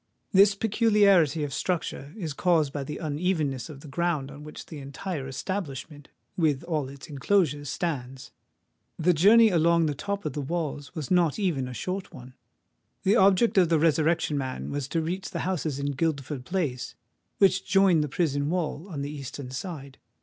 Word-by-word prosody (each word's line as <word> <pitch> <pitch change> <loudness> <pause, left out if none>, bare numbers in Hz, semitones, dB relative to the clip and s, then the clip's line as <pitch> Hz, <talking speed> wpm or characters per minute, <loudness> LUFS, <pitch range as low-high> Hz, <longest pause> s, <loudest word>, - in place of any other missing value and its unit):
This 200 0 +6
peculiarity 200 - +3
of 145 -2 -4
structure 150 -3 -2
is 165 -8 -4
caused 160 -3 +2
by 145 - -3
the 150 +2 -6
unevenness 155 -4 -1
of 140 -3 -10
the 155 - -11
ground 145 -2 -1
on 145 +1 -10
which 150 - -9
the 155 - -9
entire 140 +1 -5
establishment 145 -1 -5 0.3
with 155 -4 +1
all 155 -6 -2
its 140 0 -10
enclosures 145 -1 +1
stands. 135 -8 -4 0.7
The 175 +2 +3
journey 215 +7 +6
along 170 -1 +3
the 150 - 0
top 200 +7 -4
of 150 - -2
the 145 - -3
walls 150 0 -4
was 155 -1 -5
not 175 -4 +3
even 170 -11 0
a 125 - -7
short 185 - -4
one. 125 0 -12 0.7
The 200 +2 +4
object 195 +1 +4
of 175 -3 +4
the 165 - +4
Resurrection 155 -1 +2
Man 130 -1 -4
was 140 -2 -3
to 165 +2 -1
reach 185 +4 -3
the - - -4
houses 160 -6 -2
in 140 0 -2
Guildford 140 -2 -2
Place, 145 -9 -2 0.4
which 195 -1 +4
join 195 -5 +4
the 150 - -2
prison 145 -2 0
wall 170 0 -2
on 145 -5 -4
the 145 - -4
eastern 135 -2 -7
side. 140 -2 -7
155 Hz, 175 wpm, -27 LUFS, 140-180 Hz, 0.7 s, This